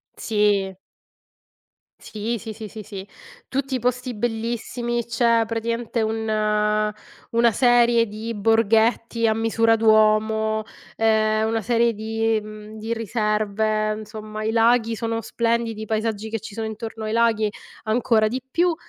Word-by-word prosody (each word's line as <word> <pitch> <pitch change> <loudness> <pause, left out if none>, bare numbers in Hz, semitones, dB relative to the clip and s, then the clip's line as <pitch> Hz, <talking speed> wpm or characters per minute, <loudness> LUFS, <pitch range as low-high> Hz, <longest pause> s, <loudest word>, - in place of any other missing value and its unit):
Sì. 205 -3 +1 1.2
Sì, 225 +2 -4
sì, 220 +1 -7
sì, 220 0 -8
sì, 215 0 -9
sì. 195 -1 -8 0.4
Tutti 270 -1 -1
posti 250 +1 -1
bellissimi. 235 +1 -2
C'è 230 0 +2
praticamente 230 +1 -2
un 215 -1 0 0.4
una 235 0 +4
serie 240 -1 +4
di 220 +2 -6
borghetti 225 +2 +2
a 220 - +4
misura 225 0 +2
d'uomo, 220 0 +3 0.3
ehm, 220 0 +2
una 225 0 0
serie 235 +1 +2
di 225 +1 0
mhmm, 215 0 -10
di 225 +2 -3
riserve, 215 -1 0
insomma, 215 0 -7
i 220 - 0
laghi 230 0 +3
sono 225 +1 -2
splendidi, 230 -2 -1
i - - -4
paesaggi 220 0 -2
che 225 - -3
ci 210 0 -10
sono 220 +1 -3
intorno 220 0 -6
ai 215 - -2
laghi 225 -2 +2 0.4
ancora 220 -1 +2
di 250 +4 -3
più. 345 +3 +2
225 Hz, 135 wpm, -23 LUFS, 215-230 Hz, 1.2 s, una